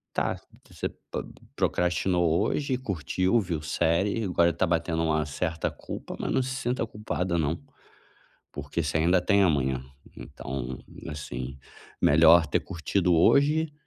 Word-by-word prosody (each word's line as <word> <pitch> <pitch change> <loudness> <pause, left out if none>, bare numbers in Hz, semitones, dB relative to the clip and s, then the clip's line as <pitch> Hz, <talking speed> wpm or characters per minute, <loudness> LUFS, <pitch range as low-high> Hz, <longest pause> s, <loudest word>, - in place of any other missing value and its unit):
Tá. - - 0 0.3
Você - - -4 0.2
po - - -3 0.3
procrastinou 90 -1 +1
hoje. 140 -3 0
Curtiu, 95 - 0
viu 85 -7 -3
série. 85 +8 +1
Agora 85 -3 +3
está 85 +2 0
batendo 85 0 0
uma 80 -1 +1
certa 80 +2 -2
culpa. - - -8
Mas - - -2
não - - +3
se 130 +1 -4
sinta 125 -2 -1
culpada, 95 -5 -2
não. 80 +1 -1 0.9
Porque 85 - -3
você 75 +1 0
ainda 90 +3 +3
tem 100 +3 +3
amanhã. 65 -7 +1 0.3
Então, 65 -1 -6 0.3
assim, 65 -3 -6 0.4
melhor 80 +2 +6
ter 75 - +1
curtido 90 +1 0
hoje 150 - +4
85 Hz, 135 wpm, -27 LUFS, 80-100 Hz, 0.9 s, melhor